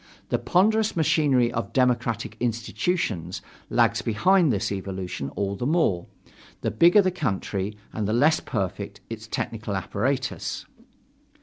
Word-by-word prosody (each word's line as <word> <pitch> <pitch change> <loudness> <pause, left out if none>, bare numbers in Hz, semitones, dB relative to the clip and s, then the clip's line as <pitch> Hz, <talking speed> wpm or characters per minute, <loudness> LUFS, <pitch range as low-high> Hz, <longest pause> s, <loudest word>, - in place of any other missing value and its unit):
The - - +1
ponderous 215 +4 +2
machinery 140 -7 +3
of 115 -4 -4
democratic 125 -3 +1
institutions 115 - -1 0.3
lags - - +3
behind 165 - +3
this 100 0 -1
evolution 95 -7 -4
all 100 0 -1
the 120 +6 -2
more, 145 - +1 0.5
the - - -1
bigger 175 +5 +6
the 185 - +2
country 105 - -2 0.2
and 105 -2 -2
the - - 0
less 145 +7 +4
perfect 100 -7 -4
its 110 -1 -6
technical 110 -2 -3
apparatus. 125 +8 -2
115 Hz, 125 wpm, -25 LUFS, 100-155 Hz, 0.5 s, bigger